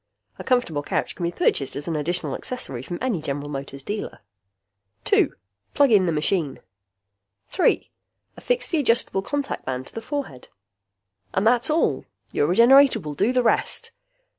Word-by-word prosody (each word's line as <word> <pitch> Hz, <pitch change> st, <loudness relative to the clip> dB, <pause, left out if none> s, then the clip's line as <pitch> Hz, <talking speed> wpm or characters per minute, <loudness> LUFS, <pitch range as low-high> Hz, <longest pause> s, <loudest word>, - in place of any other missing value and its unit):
(A -, -, -6 dB
comfortable 245 Hz, -, +1 dB
couch -, -, -2 dB
can 180 Hz, -, -6 dB
be 170 Hz, -, -1 dB
purchased 135 Hz, -5 st, 0 dB
as 145 Hz, +3 st, -5 dB
an 165 Hz, -, -2 dB
additional 170 Hz, +4 st, -1 dB
accessory 190 Hz, -, -5 dB
from 175 Hz, +7 st, -6 dB
any 230 Hz, -11 st, -1 dB
General 145 Hz, -1 st, -4 dB
Motors 140 Hz, -1 st, -6 dB
dealer.) 210 Hz, -, -5 dB, 0.8 s
2. -, -, +2 dB, 0.4 s
Plug 280 Hz, -3 st, +4 dB
in 195 Hz, -4 st, +5 dB
the -, -, +2 dB
machine. 155 Hz, -1 st, 0 dB, 0.9 s
3. 365 Hz, -, +1 dB, 0.4 s
Affix -, -, -1 dB
the 330 Hz, -, 0 dB
adjustable 235 Hz, -7 st, +1 dB
contact 285 Hz, +6 st, -3 dB
band 130 Hz, 0 st, -4 dB
to -, -, -11 dB
the 225 Hz, -, -5 dB
forehead. 270 Hz, -, -5 dB, 0.9 s
And 190 Hz, -, +1 dB
that's 240 Hz, +3 st, +4 dB
all! 310 Hz, +2 st, +1 dB, 0.3 s
Your 145 Hz, -, +1 dB
Regenerator 240 Hz, -, +6 dB
will 150 Hz, -5 st, -6 dB
do 200 Hz, -, +1 dB
the 255 Hz, -1 st, +2 dB
rest! 230 Hz, -, +1 dB
190 Hz, 160 wpm, -23 LUFS, -, 0.9 s, Regenerator